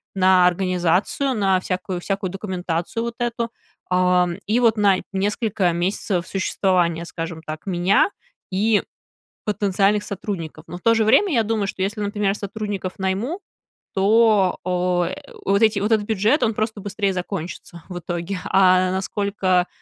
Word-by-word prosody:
на 185 -1 +5
организацию, 185 - +1
на 195 -3 +2
всякую, 185 0 -3
всякую 195 -1 -2
документацию 185 +1 -3
вот 235 0 -4
эту, 235 -1 -1 0.4
а, 180 0 +3 0.2
и 225 +4 +2
вот 230 -2 +4
на 200 -2 +4 0.2
несколько 200 -1 0
месяцев 175 0 -1
существования, 180 -3 0
скажем 165 -1 -6
так, 155 +3 -7
меня 190 - +3 0.4
и 205 +3 +2 0.6
потенциальных 205 0 +1
сотрудников. 195 -5 -5
Но 175 +2 -7
в - - -15
то 230 0 +4
же 220 -1 +2
время, 370 - +4
я 230 -4 +3
думаю, 215 -2 -1
что 190 - -3
если, 210 +2 -2
например, 205 -1 0
сотрудников 200 -2 -4
найму, 210 - -2 0.5
то, 205 -1 +4
о, 180 -1 0 0.4
вот 200 +2 +2
эти 215 -2 +3
вот 205 +3 -1
этот 215 -2 +3
бюджет, 220 +7 +2
он 225 - +2
просто 215 0 -2
быстрее 200 0 -1
закончится 175 -2 -6
в 180 -1 -5
итоге. 175 +2 -4
А 185 -1 +4
насколько, 190 -1 0
195 Hz, 145 wpm, -22 LUFS, 180-210 Hz, 0.6 s, на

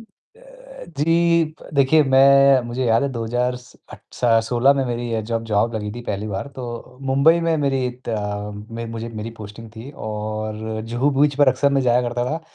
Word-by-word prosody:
अ, - - -12 1.0
जी, 170 +2 +3 0.2
प - - -13
देखिए 140 +3 +4
मैं 135 0 +6
मुझे 125 +2 -3
याद 115 +2 +3
है 140 - 0
2 115 -2 -4
हज़ार 125 +2 -1
स 125 0 -16 0.2
अट - - -11
स - - -5 0.2
सोलह 125 +3 +4
में 135 -1 0
मेरी 120 -1 -3
अ, 110 - 0
जब 115 +1 -3
जॉब 110 +3 +1
लगी 105 -1 -3
थी 120 - -7
पहली 105 +2 -3
बार, 100 +8 -4
तो 125 -1 -8
मुंबई 160 +5 +4
में 165 -1 +1
मेरी 135 -3 0 0.2
ता 105 -2 -3 0.2
में 115 +1 -5
मुझे 115 +1 -5
मेरी 110 0 -6
पोस्टिंग 110 +2 -10
थी 125 +6 -8 0.2
और 110 +1 -4
जुहू 135 +5 +1
बीच 145 -1 +3
पर 145 -2 +6
अक्सर 130 +2 +2
मैं 135 - +2
जाया 125 0 +3
करता 120 +1 -2
था 160 +2 -3
120 Hz, 200 wpm, -21 LUFS, 110-140 Hz, 1.0 s, मैं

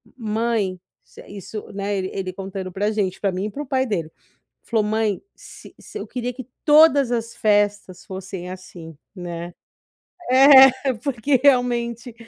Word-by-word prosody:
"Mãe", 220 -4 -2 0.3
isso - - -18
isso, 205 +1 -9
né, 200 +1 -3
ele 185 0 -3
ele 185 -1 -4
contando 190 -1 -6
pra 205 +4 -1
gente, 200 -4 -2
pra 200 - 0
mim 185 +2 -3
e 210 - -4
pro 295 +5 -6
pai 260 0 0
dele, 165 -7 -3 0.5
falou: 225 -2 0
"Mãe, 215 -1 -1
se - - -13
se - - -10
eu - - -7
queria 245 -1 -4
que 255 -1 -10 0.2
todas 295 -4 +5
as 230 -1 -3
festas 205 -3 0
fossem 190 -1 -7
assim, 175 -3 -10 0.2
né", 175 -1 -7 0.8
é, 265 0 +7
porque 270 0 0
realmente 240 -3 +1
215 Hz, 150 wpm, -22 LUFS, 190-245 Hz, 0.8 s, é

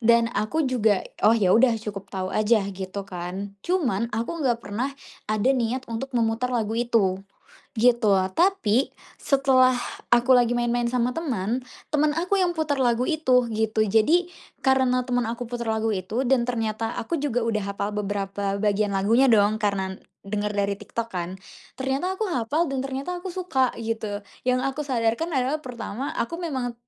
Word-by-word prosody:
Dan 235 0 +4
aku 215 +10 0
juga, 220 -6 +2 0.2
"Oh 215 - +7
ya 190 -5 +3
udah 240 0 +5
cukup 205 -3 -7
tahu 190 -1 -3
aja," 215 -1 +3
gitu 190 +1 -5
kan. 185 +3 -6
Cuman, 245 - 0
aku 235 +10 -3
nggak 245 -4 +2
pernah 215 +7 -3 0.4
ada 215 +4 +2
niat 250 0 -1
untuk 255 +4 -5
memutar 230 +1 +1
lagu 225 -3 0
itu 230 -6 +2 0.6
gitu. 235 -4 +4 0.2
Tapi 275 - +2 0.3
setelah 260 -2 +4 0.3
aku 240 +2 +5
lagi 245 -1 +4
main-main 240 0 +1
sama 250 0 +1
teman, 245 - -1 0.3
temen 300 0 +3
aku 360 +4 0
yang 360 - +3
putar 295 -3 0
lagu 240 0 +2
itu 260 -7 +3
gitu. 220 0 +1
Jadi 295 - +3 0.4
karena 260 -2 +3
temen 245 -1 +1
aku 235 +2 -4
putar 235 0 -4
lagu 220 0 0
itu 210 +7 -2
dan 255 -1 +3
ternyata 225 -2 -1
aku 285 - -3
juga 245 -5 0
udah 215 -2 0
hafal 200 +1 -3
beberapa 200 -1 -2
bagian 205 0 +1
lagunya 215 +7 +3
dong 210 -1 +4
karena 190 -2 -1 0.2
denger 210 +1 -2
dari 200 0 0
TikTok 215 +3 -5
kan. 180 +1 -4 0.4
Ternyata 275 +8 -1
aku 440 - 0
hafal 295 +3 0
dan 270 -1 -2
ternyata 275 +7 -4
aku 375 - -4
suka 345 -9 0
gitu. 220 -2 -3 0.2
Yang 255 0 +2
aku 270 +2 -2
sadarkan 255 +4 0
adalah 275 +2 0
pertama 245 0 -5
aku 335 +9 -2
memang 260 -7 -3
235 Hz, 165 wpm, -25 LUFS, 210-265 Hz, 0.6 s, Oh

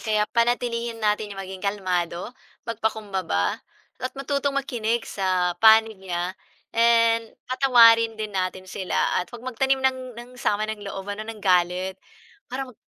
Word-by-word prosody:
kaya 215 -1 +1
panatilihin 235 0 0
natin 210 -2 -1
maging 190 -1 -7
kalmado, 185 0 -2 0.3
magpakumbaba, 205 - -2 0.4
at 255 - -3
matutong 280 0 -1
makinig 235 -4 -1
sa 185 -2 0
panig 220 -2 +6
niya 180 -1 -3 0.4
and 230 -1 +4 0.2
patawarin 230 -4 +5
din 215 -1 -5
natin 185 0 -2
sila 185 -1 -1
at 180 - -6
'wag 240 +1 -11
magtanim 265 +2 +1
ng 255 -2 -1
ng 240 +1 -10
sama 210 +1 +1
ng 215 -1 -5
loob 195 -1 -6
ano, 215 +2 -7
ng 215 -2 -8
galit. 180 +1 +1 0.5
Para 265 +2 -3
mag 255 -3 -14
220 Hz, 140 wpm, -24 LUFS, 190-235 Hz, 0.5 s, panig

